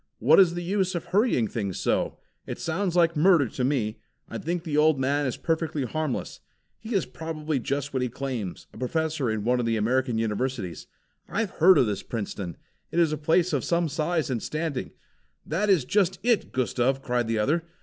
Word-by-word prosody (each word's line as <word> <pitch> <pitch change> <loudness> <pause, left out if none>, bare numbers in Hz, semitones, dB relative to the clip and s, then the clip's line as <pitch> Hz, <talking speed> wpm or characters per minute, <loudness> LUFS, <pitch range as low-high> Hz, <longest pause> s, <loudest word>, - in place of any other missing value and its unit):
"What - - +5
is 175 -3 +5
the 175 - -3
use 190 0 0
of 170 - -3
hurrying 195 - +2
things 100 -4 -3
so? - - 0 0.3
It - - -4
sounds 180 +2 -2
like 170 -1 +4
murder 160 -3 +5
to 125 - -3
me. 125 -5 0 0.3
I - - -6
think 170 +1 -2
the 155 -4 -3
old 150 -1 +4
man 140 +2 +1
is 125 - -3
perfectly 160 -3 -1
harmless. 155 +1 -3 0.4
He 225 0 -5
is 190 - +2
probably 155 -3 -3
just 140 +3 -3
what 130 - 0
he 125 - 0
claims, 120 -7 -5
a - - -11
professor 155 0 -1
in 110 -1 -2
one 125 +2 +2
of 120 - 0
the 115 -1 +1
American 125 +2 +1
Universities. 110 -3 -2 0.4
I've 210 0 -1
heard 180 +2 +6
of 130 - +5
this 105 -3 -2
Princeton. 100 -6 -5 0.3
It - - -4
is 165 -3 +3
a - - +1
place 165 +4 +2
of - - +1
some 170 0 +1
size 155 0 -1
and 120 -3 -1
standing." 155 -4 -3 0.6
"That 195 +7 0
is 175 -10 +4
just 190 +4 +2
it, 235 -5 +2
Gustav!" 130 +1 0
cried 120 -1 0
the 115 0 0
other. 150 +10 +1
150 Hz, 200 wpm, -26 LUFS, 125-170 Hz, 0.6 s, heard